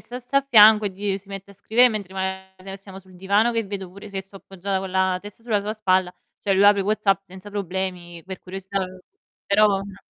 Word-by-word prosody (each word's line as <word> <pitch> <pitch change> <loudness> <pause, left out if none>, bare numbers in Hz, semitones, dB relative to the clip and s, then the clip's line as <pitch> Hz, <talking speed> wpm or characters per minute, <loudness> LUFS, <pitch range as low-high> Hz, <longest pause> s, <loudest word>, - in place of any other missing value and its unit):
stesse 250 +2 -5
a - - +6
fianco 215 -2 +7
e - - -2
di 200 +2 -3
uhm, 195 - 0
si 200 0 -19
mette 195 0 -8
a - - -15
scrivere 235 +5 +4
mentre 200 -4 -6
maga 190 0 -5
siamo 195 -1 -12
sul 185 -1 -18
divano 200 +6 +2
che 230 -1 0
vedo 195 -3 -7
pure 200 +3 -11
che 195 -1 -5
sto 195 +1 -15
appoggiata 195 0 -4
con 190 0 -5
la 190 0 +1
testa 205 +2 -12
sulla 220 -4 0
sua 210 +2 -4
spalla, 185 -4 +1 0.3
cioè 195 - +1
lui 195 +1 +4
apre 205 0 +6
WhatsApp 200 -1 +1
senza 190 +2 -12
problemi 180 -3 -4
per 190 0 -7
curiosità, 195 +1 -5
uhm 185 0 -6 0.5
però 205 +2 +4
no 200 -1 -2
195 Hz, 225 wpm, -23 LUFS, 190-205 Hz, 0.5 s, fianco